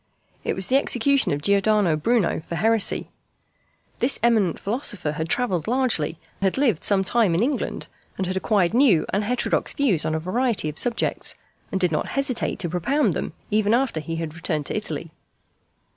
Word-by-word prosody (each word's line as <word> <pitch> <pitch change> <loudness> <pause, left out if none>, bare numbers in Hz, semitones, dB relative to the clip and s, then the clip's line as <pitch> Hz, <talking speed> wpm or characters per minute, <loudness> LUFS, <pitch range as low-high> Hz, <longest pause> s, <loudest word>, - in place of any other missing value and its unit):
It - - -1
was 190 - -1
the 260 +8 +3
execution 275 +1 +2
of 145 0 -2
Giordano 200 -3 +3
Bruno 205 +5 +1
for 165 +2 -7
heresy. 225 +3 +1 0.9
This 250 +3 +2
eminent 220 -8 +2
philosopher 205 - -1
had 160 +2 -4
travelled 185 -10 0
largely, 235 - +1 0.2
had 190 +3 +1
lived 245 - +1
some 195 -2 +3
time 200 -3 +2
in 185 - +2
England, 270 0 -2 0.3
had 185 0 -2
acquired 190 -1 +1
new 235 - +4
and 200 +2 +1
heterodox 245 +4 0
views 240 - +1
on 155 - -1
a - - 0
variety 210 0 0
of 150 - -5
subjects, 240 -2 -1 0.4
and 190 - -1
did 180 -3 +2
not 155 - -1
hesitate 275 -3 0
to 175 - -1
propound 245 - +1
them - - -4 0.2
even 215 +1 +3
after 250 -9 0
he 165 +2 -5
had 165 -2 -4
returned 160 -2 -1
to - - -4
Italy. - - -4
200 Hz, 175 wpm, -23 LUFS, 170-245 Hz, 0.9 s, new